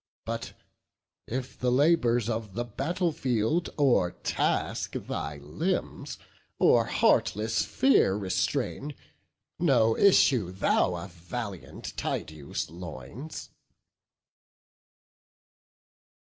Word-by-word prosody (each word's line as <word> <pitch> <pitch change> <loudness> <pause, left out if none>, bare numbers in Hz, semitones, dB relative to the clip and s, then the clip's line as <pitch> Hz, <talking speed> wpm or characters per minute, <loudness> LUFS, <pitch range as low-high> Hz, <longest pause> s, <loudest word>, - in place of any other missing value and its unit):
But, - - -4 0.7
if 125 +2 -5
the 125 -1 +1
labours 125 -5 +3
of 110 -4 -3
the 120 - -1
battle 165 - -1
field 130 +5 0
O'ertask 125 - +1
thy 75 0 -4
limbs, 140 - -3 0.4
or - - +5
heartless 110 +2 +2
fear 260 - +3
restrain, 105 +8 -2 0.6
No 120 -9 +4
issue 130 - +4
thou 95 -1 +2
of 85 +2 -7
valiant 95 +2 -7
Tydeus' 75 -1 -4
loins." 85 - -8
115 Hz, 80 wpm, -28 LUFS, 95-140 Hz, 0.7 s, or